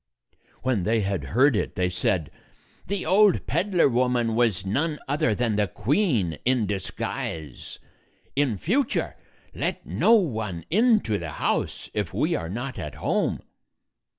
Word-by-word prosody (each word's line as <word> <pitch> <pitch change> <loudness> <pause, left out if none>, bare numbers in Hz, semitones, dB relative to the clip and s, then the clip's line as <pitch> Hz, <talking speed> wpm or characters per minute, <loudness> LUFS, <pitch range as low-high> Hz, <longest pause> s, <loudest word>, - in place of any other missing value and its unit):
When 130 -6 +1
they 110 +4 +1
had 95 -7 -2
heard 125 - +3
it, - - -2
they 90 0 +1
said, 90 -3 0 0.6
"The 200 0 -2
old 195 +3 +4
peddler 175 +1 +2
woman 125 -2 +1
was 110 -6 +1
none 150 +10 0
other 145 -5 +1
than 115 -3 0
the 105 -1 +2
queen 110 - 0
in 125 -3 +2
disguise. 90 -6 -5 0.6
In 135 -7 +1
future 235 - 0 0.4
let - - -3
no 230 - +3
one 110 - -1
into 215 - +3
the 80 -3 -6
house, - - -2
if - - -3
we - - +1
are 85 - -3
not 120 +4 -5
at 75 -6 -6
home." - - -1
115 Hz, 140 wpm, -25 LUFS, 95-150 Hz, 0.6 s, old